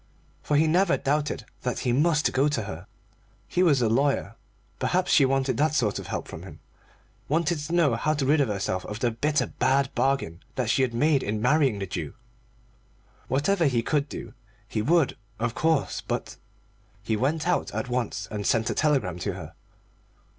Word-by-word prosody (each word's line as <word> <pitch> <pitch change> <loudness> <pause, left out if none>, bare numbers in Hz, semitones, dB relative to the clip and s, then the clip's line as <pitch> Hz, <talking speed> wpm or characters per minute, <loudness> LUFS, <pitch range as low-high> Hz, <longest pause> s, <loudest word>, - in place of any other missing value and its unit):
For 150 - +1
he 155 - +4
never 175 +3 +3
doubted 145 -3 -1 0.2
that 125 - -2
he 125 - +1
must 155 +3 +2
go 135 +3 +3
to 135 -7 -1
her. 95 -2 -8 0.6
He 180 - 0
was 145 -8 +4
a - - +3
lawyer; 135 +5 +1 0.4
perhaps 180 +1 +1
she 140 - +6
wanted 135 -2 +1
that 155 +3 +2
sort 110 -8 +1
of - - -8
help - - -4
from - - -8
him, - - -11 0.7
wanted 165 +2 +1
to 150 +3 -5
know 165 -7 +3
how 155 +7 0
to 140 -2 -1
rid 150 +3 +3
herself 100 -7 -1
of 105 +1 -5
the 120 0 +1
bitter 145 +6 0
bad 135 0 +1
bargain 125 -9 0
that 125 -3 0
she 135 - +2
had 125 -3 0
made 145 +2 +3
in 105 +1 -2
marrying 130 -1 +3
the 100 - -3
Jew. - - -5 1.1
Whatever 165 +6 +1
he 125 -5 +2
could 145 +1 0
do - - -7 0.3
he 110 -1 -2
would, 160 +4 +2 0.2
of 115 0 -1
course, 160 -1 0
but - - -4 0.7
He 110 - 0
went 150 +8 0
out 180 - 0
at 110 +4 -3
once 120 -5 -2
and 105 -1 -3
sent 115 0 +2
a - - 0
telegram 130 - +1
to - - -2
her. - - -9
135 Hz, 185 wpm, -26 LUFS, 115-155 Hz, 1.1 s, she